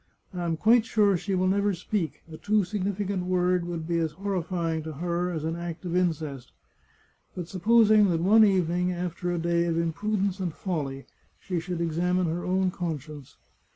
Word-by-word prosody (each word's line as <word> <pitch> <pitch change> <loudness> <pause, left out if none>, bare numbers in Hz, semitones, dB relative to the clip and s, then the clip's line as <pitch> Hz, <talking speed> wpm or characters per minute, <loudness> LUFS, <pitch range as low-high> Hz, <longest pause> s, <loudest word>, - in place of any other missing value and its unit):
I 175 -1 -3
am 165 -1 -1
quite 225 +5 +5
sure 210 -4 +3
she 190 +2 -2
will 185 0 +1
never 200 +1 +1
speak 175 -2 -3
— 165 - -18
a - - -7
too 210 +5 +1
significant 195 -1 -2
word 180 -1 +1
would 170 -2 -4
be 170 -1 0
as 160 -2 -1
horrifying 170 -3 -2
to 155 0 -6
her 175 +3 -2
as 160 -3 -4
an 160 +1 -2
act 170 +1 -6
of 175 0 -2
incest. 155 -7 -2 0.8
But 175 -2 -5
supposing 215 +2 +4
that 165 -2 +1
one 210 +6 +6
evening, 180 -3 +2
after 175 0 -3
a 175 - -1
day 170 0 +1
of 165 -1 0
imprudence 195 +4 -1
and 175 -4 -3
folly, 140 -8 -4 0.3
she 180 -3 -3
should 175 0 -4
examine 175 +2 +1
her 170 +2 -2
own 185 0 +1
conscience 155 -6 -6
180 Hz, 185 wpm, -27 LUFS, 165-195 Hz, 0.8 s, one